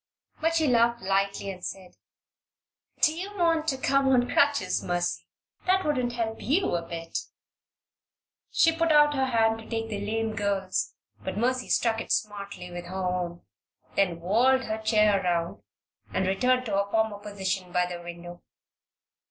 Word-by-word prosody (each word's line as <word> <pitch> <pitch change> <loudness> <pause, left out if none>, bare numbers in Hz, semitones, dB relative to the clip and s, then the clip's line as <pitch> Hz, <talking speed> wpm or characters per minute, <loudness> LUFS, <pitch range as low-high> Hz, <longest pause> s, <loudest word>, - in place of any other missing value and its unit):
But 325 +1 +1
she 320 -1 +3
laughed 235 -4 +3
lightly, 195 +1 0
and 185 -1 -11
said: 185 -2 -6 1.1
"Do 310 - +5
you 395 +4 -6
want 330 -3 +2
me - - -18
to 270 -4 +1
come 275 0 +3
on 250 -2 +3
crutches, 280 -11 +2
Mercy? 175 0 -2 0.4
That 375 +1 +3
wouldn't 255 -5 0
help 225 -2 -3
you 300 - +1
a 170 - 0
bit." 165 0 -5 1.3
She 325 0 +3
put 330 0 +2
out 295 -1 +6
her 265 -2 +1
hand 225 -2 +2
to 225 - -12
take 225 -1 -2
the 205 -2 -4
lame 220 +1 -2
girl's, 200 -3 -1 0.3
but 190 - -4
Mercy 250 +3 0
struck 225 -1 +2
it - - -7
smartly 200 -4 -3
with 175 0 -6
her 180 +2 -8
own, 180 -1 -2 0.5
then 180 -4 +1
whirled 250 +9 +3
her 220 -2 -3
chair 215 -2 +3
around 170 -1 -1 0.5
and 190 - 0
returned 250 +7 +2
to 220 - -4
her 200 0 0
former 220 -1 0
position 190 -3 -3
by 180 0 +2
the 175 -1 -6
window. 175 0 -9
215 Hz, 165 wpm, -27 LUFS, 185-255 Hz, 1.3 s, out